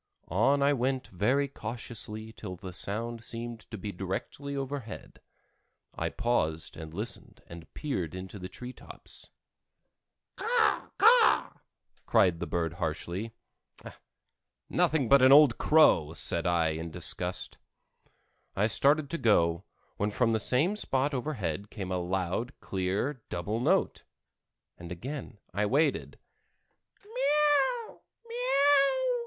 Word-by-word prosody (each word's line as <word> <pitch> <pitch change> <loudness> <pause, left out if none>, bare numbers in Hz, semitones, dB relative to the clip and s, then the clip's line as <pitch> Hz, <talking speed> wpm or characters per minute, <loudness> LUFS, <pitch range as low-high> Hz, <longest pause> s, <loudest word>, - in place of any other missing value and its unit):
On 135 - +3
I 145 +1 +4
went 130 0 -1
very 125 +10 +1
cautiously 110 -3 -6
till 95 -5 -7
the 90 0 -9
sound 115 +5 -4
seemed 115 -1 -6
to 110 - -6
be 100 +2 -5
directly 120 +10 -5
overhead. 135 -4 -6 0.7
I - - -2
paused 80 -10 -1
and 80 -1 -8
listened 105 +8 -7
and 85 -1 -12
peered 95 - -3
into 95 +2 -7
the 90 0 -7
tree 125 +6 -8
tops. - - -8 1.1
"Caw 465 -1 +1
caw!" 460 +2 +5 0.6
cried 90 -3 +3
the 85 - -3
bird 80 +1 -1
harshly. 90 +8 -3 1.4
"Nothing 150 -6 +2
but 140 +3 +6
an 130 +1 +7
old 140 -4 +7
crow," 115 - +5
said 85 +1 +1
I 85 -2 +2
in 80 +1 -4
disgust. - - -4 1.0
I 100 - +2
started 145 +6 +3
to 170 - -2
go, 85 -5 +2 0.3
when 105 - 0
from 115 +2 +1
the 110 - +1
same 140 - +2
spot 140 -7 0
overhead 105 - -3
came 95 -4 -6
a 90 - 0
loud, 95 +7 -2
clear 100 +9 -2
double 100 +6 -2
note, 120 - +1 0.8
and 85 -1 -9
again 130 - -6 0.2
I 105 +1 +1
waited. 145 +5 +1
110 Hz, 120 wpm, -29 LUFS, 90-135 Hz, 1.4 s, an